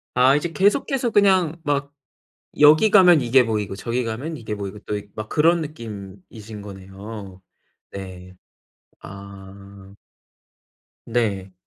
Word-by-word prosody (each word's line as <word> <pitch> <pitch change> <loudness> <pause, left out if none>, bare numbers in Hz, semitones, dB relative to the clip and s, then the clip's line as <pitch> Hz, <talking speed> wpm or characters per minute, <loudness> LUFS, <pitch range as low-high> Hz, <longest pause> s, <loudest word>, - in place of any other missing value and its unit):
아 130 +2 +5
이제 165 +3 -2
계속해서 235 +7 +1
그냥 190 -6 +3
막 145 -1 -2 0.7
여기 155 +8 +6
가면 180 -6 +6
이게 125 +1 +4
보이고 105 -3 -3
저기 120 +4 -2
가면 130 +8 -5
이게 110 -4 -5
보이고 100 0 -7
또 105 - -5
이 105 0 -10
막 110 0 -6
그런 165 +2 +3
느낌이신 105 - -9
거네요. 95 0 -10 0.5
네. 95 -1 -9 0.7
아. 100 0 -12 1.1
네. 105 -5 -2
110 Hz, 220 characters per minute, -22 LUFS, 100-150 Hz, 1.1 s, 여기